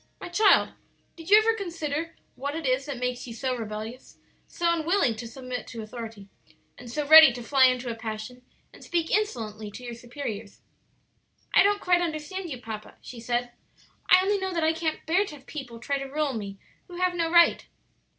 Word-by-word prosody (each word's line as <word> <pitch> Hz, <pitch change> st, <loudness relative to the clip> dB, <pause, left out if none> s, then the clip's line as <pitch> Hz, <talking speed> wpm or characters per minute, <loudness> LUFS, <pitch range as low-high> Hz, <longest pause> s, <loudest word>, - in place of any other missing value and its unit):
My -, -, -7 dB
child, 400 Hz, +3 st, +4 dB, 0.4 s
did 330 Hz, +1 st, -11 dB
you 415 Hz, -, +9 dB
ever 445 Hz, +1 st, +4 dB
consider 330 Hz, -6 st, -4 dB, 0.2 s
what 285 Hz, +3 st, -5 dB
it 325 Hz, -2 st, -5 dB
is 260 Hz, +2 st, 0 dB
that 280 Hz, -3 st, -4 dB
makes 250 Hz, 0 st, -3 dB
you 230 Hz, -, -8 dB
so 255 Hz, +2 st, -2 dB
rebellious, 220 Hz, +1 st, -7 dB, 0.3 s
so 340 Hz, 0 st, 0 dB
unwilling 330 Hz, -, +1 dB
to 235 Hz, -, -6 dB
submit 255 Hz, -1 st, -7 dB
to 225 Hz, -1 st, -7 dB
authority, 220 Hz, -2 st, -8 dB, 0.5 s
and 245 Hz, -1 st, -11 dB
so 295 Hz, +5 st, -2 dB
ready 315 Hz, -2 st, +10 dB
to 240 Hz, 0 st, -7 dB
fly 265 Hz, +2 st, +5 dB
into 255 Hz, 0 st, +1 dB
a 235 Hz, -, -2 dB
passion 225 Hz, +2 st, -7 dB, 0.3 s
and -, -, -14 dB
speak 335 Hz, -2 st, -1 dB
insolently 220 Hz, -, -2 dB
to 250 Hz, +5 st, -11 dB
your 240 Hz, -1 st, -6 dB
superiors?" 235 Hz, -4 st, -7 dB, 0.9 s
"I -, -, +7 dB
don't 410 Hz, 0 st, +3 dB
quite 355 Hz, -1 st, +3 dB
understand 340 Hz, +3 st, -4 dB
you 255 Hz, -5 st, -6 dB
papa," 220 Hz, -2 st, -8 dB
she 245 Hz, -, -10 dB
said. 240 Hz, +1 st, -2 dB, 0.6 s
"I 365 Hz, -, +8 dB
only 405 Hz, +1 st, +1 dB
know 380 Hz, 0 st, -3 dB
that 335 Hz, -2 st, 0 dB
I 320 Hz, +1 st, +3 dB
can't 320 Hz, -1 st, -3 dB
bear 355 Hz, +5 st, +3 dB
to 310 Hz, -, -9 dB
have 270 Hz, -2 st, -17 dB
people 265 Hz, -7 st, -8 dB
try 280 Hz, +4 st, -2 dB
to 275 Hz, -, -5 dB
rule 290 Hz, 0 st, -1 dB
me 200 Hz, -3 st, -6 dB, 0.3 s
who 355 Hz, -, -11 dB
have 365 Hz, 0 st, +1 dB
no 335 Hz, -2 st, -1 dB
right." 340 Hz, 0 st, +4 dB
275 Hz, 200 wpm, -26 LUFS, 235-335 Hz, 0.9 s, ready